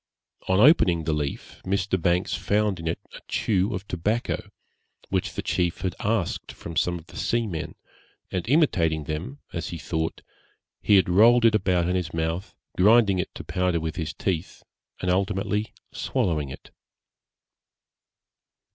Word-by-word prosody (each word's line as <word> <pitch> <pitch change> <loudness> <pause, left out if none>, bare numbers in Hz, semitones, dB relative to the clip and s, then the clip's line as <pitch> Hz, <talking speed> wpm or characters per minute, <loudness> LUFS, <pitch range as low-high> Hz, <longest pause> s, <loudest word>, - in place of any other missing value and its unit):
On 95 +1 +3
opening 100 - +5
the 80 0 0
leaf 75 -2 -4
Mr. 95 -1 0
Banks 90 +2 +1
found 105 -2 0
in 85 - -5
it 80 - 0 0.2
a - - -9
chew 100 0 +1
of 95 +2 -6
tobacco, 105 +4 -2 0.6
which - - -1
the - - -3
chief 85 -1 0
had 95 -2 -1
asked 105 -4 -1
from 85 - -8
some 90 +1 +1
of 80 - -12
the - - -12
seamen, 105 -10 -2 0.6
and 90 +4 -3
imitating 85 - +3
them, 80 - -5
as 85 -1 -3
he 85 - -5
thought, 80 0 -3 0.6
he 105 - +4
had 95 -3 +5
rolled 115 +6 +6
it 115 - +6
about 90 -5 +2
in 90 - 0
his 85 -3 -2
mouth, 80 +3 -2 0.2
grinding 100 -1 +5
it 90 - -2
to - - -7
powder 90 -2 0
with 80 0 -4
his 80 -3 -3
teeth, 85 +2 -3 0.4
and 90 - +1
ultimately 100 +3 0 0.2
swallowing 75 -6 -1
it. 65 - -11
90 Hz, 155 wpm, -25 LUFS, 85-105 Hz, 0.6 s, rolled